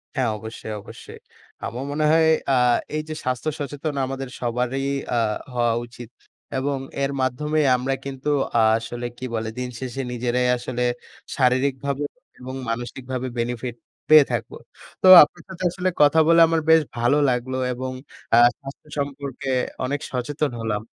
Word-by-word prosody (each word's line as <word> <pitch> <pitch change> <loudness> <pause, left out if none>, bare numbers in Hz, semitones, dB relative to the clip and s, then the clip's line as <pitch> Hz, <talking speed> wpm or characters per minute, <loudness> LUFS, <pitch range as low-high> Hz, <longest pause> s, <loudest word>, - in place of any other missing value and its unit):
হ্যাঁ, 130 -4 +1
অবশ্যই, 110 0 -7
অবশ্যই। - - -12 0.5
আমার 125 +3 -5
মনে 150 +1 0
হয় 160 0 +5 0.2
অ্যা 135 - +4 0.4
এই 155 - 0
যে - - -3
স্বাস্থ্য 130 +4 -1
সচেতন 145 +1 -4
আমাদের 135 0 -5
সবারই 125 +2 -1 0.3
আ - - +2 0.4
হওয়া 120 -1 +2
উচিত। 120 -1 -11 0.5
এবং 140 +1 -1 0.3
এর 135 - 0
মাধ্যমেই 150 +4 0
আমরা 130 +2 -1
কিন্তু 135 +1 -4 0.5
আসলে 120 +2 -4
কি 130 - -6
বলে? 110 0 -2
দিনশেষে 125 +1 -5
নিজেরাই 125 +1 0
আসলে 125 0 -3 0.5
শারীরিকভাবে 135 +2 +1 0.4
এবং 130 +1 -7
মানসিকভাবে 125 +2 -4
বেনিফিট 120 0 -3 0.3
পেয়ে 155 -2 +9
থাকব। - - -2 0.5
তো 185 - +4 0.2
আপনার 175 +3 -5
সাথে 185 0 -7
আসলে 185 0 -1
কথা 150 +2 +6
বলে 165 0 +6
আমার 165 0 +1
বেশ 160 0 +7 0.2
ভালো 120 +5 +3
লাগলো 125 +1 -1 0.2
এবং 130 +1 -4 0.4
অ্যা 115 - +6 0.2
স্বাস্থ্য 135 +2 -11
সম্পর্কে 140 -1 -4 0.4
অনেক 145 +2 -2
সচেতন 140 +3 -2
হলাম। 105 -2 -2
130 Hz, 145 wpm, -23 LUFS, 120-145 Hz, 0.5 s, পেয়ে